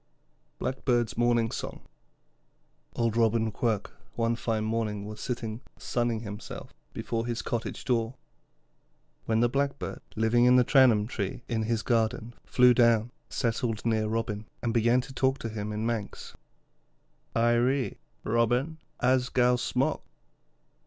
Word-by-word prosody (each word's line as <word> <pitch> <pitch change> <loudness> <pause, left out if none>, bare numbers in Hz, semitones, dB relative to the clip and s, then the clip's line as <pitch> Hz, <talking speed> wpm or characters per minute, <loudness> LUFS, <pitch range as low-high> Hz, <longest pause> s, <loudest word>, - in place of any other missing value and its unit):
BLACKBIRD'S 125 -3 0
MORNING 120 -1 +2
SONG - - -5 1.1
Old 115 -2 0
Robin 115 -1 +2
Quirk 110 -1 -1 0.2
one 115 0 +1
fine 115 -2 -1
morning 110 -2 -2
was 105 0 -8
sitting 115 -2 -4 0.2
sunning 120 -2 -1
himself 105 -1 -8 0.2
before 115 0 -3
his 120 -1 -2
cottage 115 -2 -4
door, 120 -1 0 1.1
when 110 0 +2
the 120 - +5
Blackbird, 140 +3 -2
living 115 +2 +3
in 125 0 +6
the 125 - +6
Tramman 120 -5 +5
Tree 105 0 -4
in 115 -2 -1
his 110 0 -1
garden, 115 0 0
flew 125 -1 +5
down, 120 -1 +3 0.2
settled 115 -1 -1
near 110 -2 +1
Robin, 110 -1 -2 0.2
and 115 - 0
began 120 +2 +3
to 135 +2 -11
talk 130 +1 +1
to 115 - -5
him 105 -1 -4
in 105 +1 -3
Manx: 115 -3 -4 1.0
'Irree, 120 +3 +2 0.2
Robin, 120 +8 +1 0.2
as 125 0 +3
gow 125 -1 +3
smook.' 120 - 0
115 Hz, 130 wpm, -28 LUFS, 110-125 Hz, 1.1 s, in